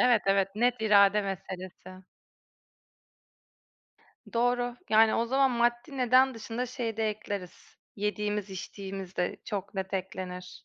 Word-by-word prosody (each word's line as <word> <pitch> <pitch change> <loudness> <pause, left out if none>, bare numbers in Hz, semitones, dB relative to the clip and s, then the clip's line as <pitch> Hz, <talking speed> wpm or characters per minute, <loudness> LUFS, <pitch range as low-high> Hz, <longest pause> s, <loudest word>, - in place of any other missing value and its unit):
Evet, 245 -4 +5
evet, 195 -1 +3
net 240 +3 +3
irade 205 -1 +5
meselesi. 185 -1 -7 2.3
Doğru. 245 +1 +1
Yani 220 0 +6
o 230 - +1
zaman 270 +2 +3
maddi 240 +4 0
neden 255 +1 +4
dışında 230 +2 -4
şeyi 240 -3 -4
de 220 -1 +1
ekleriz. 205 -4 -7 0.2
Yediğimiz 210 0 -2
içtiğimiz 190 0 -7
de 180 - -1
çok 200 -2 -5
net 190 0 -3
eklenir. 180 -1 -5
210 Hz, 120 wpm, -29 LUFS, 190-240 Hz, 2.3 s, Yani